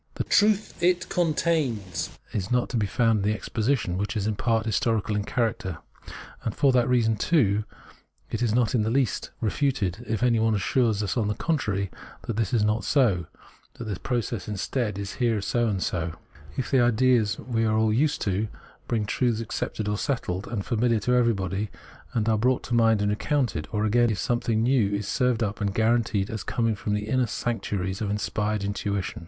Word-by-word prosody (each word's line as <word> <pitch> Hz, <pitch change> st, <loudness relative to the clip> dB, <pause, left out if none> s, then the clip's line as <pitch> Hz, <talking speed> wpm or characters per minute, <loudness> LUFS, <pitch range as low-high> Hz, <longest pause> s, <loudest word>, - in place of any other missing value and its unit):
The -, -, -1 dB
truth 210 Hz, -2 st, +2 dB
it 180 Hz, +1 st, +2 dB
contains 150 Hz, -, 0 dB, 0.2 s
is 95 Hz, -3 st, -2 dB
not 125 Hz, 0 st, +1 dB
to 125 Hz, -, -1 dB
be 105 Hz, -2 st, +1 dB
found 115 Hz, +2 st, +2 dB
in 105 Hz, +2 st, +2 dB
this -, -, -3 dB
exposition, 110 Hz, -5 st, -1 dB
which 105 Hz, +3 st, -2 dB
is 100 Hz, -, -1 dB
in 110 Hz, -1 st, 0 dB
part 115 Hz, 0 st, +1 dB
historical 110 Hz, -1 st, 0 dB
in 105 Hz, -, 0 dB
character. 115 Hz, -9 st, -1 dB, 0.7 s
And 115 Hz, -, -2 dB
just -, -, -20 dB
for 140 Hz, -, +5 dB
that 125 Hz, 0 st, +2 dB
reason, 115 Hz, -3 st, +2 dB
too, 105 Hz, -, +2 dB, 0.7 s
it 115 Hz, -, -2 dB
is 120 Hz, -3 st, +2 dB
not 120 Hz, +2 st, +2 dB
in 120 Hz, -, +3 dB
the 105 Hz, -, 0 dB
least 125 Hz, -5 st, 0 dB
66 110 Hz, -, -1 dB
Phenomenology 140 Hz, -2 st, +2 dB
of -, -, -9 dB
Mind 90 Hz, 0 st, -1 dB
refuted 115 Hz, -, -4 dB
if -, -, -3 dB
anyone 115 Hz, -2 st, +3 dB
assures 110 Hz, +1 st, +1 dB
us 105 Hz, -, -2 dB
on 110 Hz, -3 st, +1 dB
the 105 Hz, -, -1 dB
contrary 100 Hz, -, -1 dB, 0.3 s
that 115 Hz, -, -3 dB
this 110 Hz, -3 st, 0 dB
is 115 Hz, -4 st, +2 dB
not 105 Hz, 0 st, +1 dB
so, 105 Hz, -, +2 dB, 0.5 s
that -, -, -7 dB
the 105 Hz, -5 st, -4 dB
process 120 Hz, -6 st, -2 dB
instead 105 Hz, +1 st, -2 dB
is 100 Hz, 0 st, -4 dB
here 115 Hz, -3 st, +2 dB
so 120 Hz, +4 st, 0 dB
and 95 Hz, -4 st, -1 dB
so, 80 Hz, -2 st, -2 dB, 0.4 s
if 130 Hz, -, -3 dB
ideas 120 Hz, -3 st, +3 dB
we 115 Hz, -3 st, -1 dB
are 110 Hz, -1 st, +2 dB
all 110 Hz, -1 st, +3 dB
used 145 Hz, +6 st, +1 dB
to, 100 Hz, +2 st, 0 dB, 0.4 s
being 110 Hz, -3 st, 0 dB
truths 115 Hz, +1 st, 0 dB
accepted 110 Hz, -1 st, -3 dB
or 105 Hz, 0 st, -1 dB
settled 105 Hz, -9 st, -2 dB
and 105 Hz, -5 st, -3 dB
famihar 115 Hz, -1 st, +1 dB
to 125 Hz, -, +2 dB
everyone, 105 Hz, -4 st, +1 dB, 0.5 s
are 110 Hz, -1 st, +2 dB
brought 125 Hz, +3 st, +2 dB
to 120 Hz, -, -5 dB
mind 115 Hz, -3 st, +4 dB
and 105 Hz, -, +1 dB
recoimted, 125 Hz, -, -1 dB
or, 105 Hz, 0 st, 0 dB
again, 120 Hz, +2 st, +3 dB
if 110 Hz, -, -1 dB
something 115 Hz, -2 st, 0 dB
new 120 Hz, -5 st, +3 dB
is 100 Hz, -1 st, -3 dB
served 125 Hz, -2 st, +1 dB
up 105 Hz, +1 st, -3 dB
and 100 Hz, -1 st, -1 dB
guaranteed 110 Hz, -3 st, +1 dB
as 110 Hz, -3 st, -4 dB
coming 115 Hz, +3 st, 0 dB
from 105 Hz, 0 st, -2 dB
the 105 Hz, 0 st, -3 dB
inner 130 Hz, +1 st, +1 dB
sanc 120 Hz, +2 st, -2 dB
tuaries 95 Hz, -1 st, -3 dB
of 105 Hz, -, -1 dB
inspired 105 Hz, 0 st, -1 dB
intuition. 100 Hz, -1 st, -2 dB
110 Hz, 205 wpm, -26 LUFS, 105-120 Hz, 0.7 s, for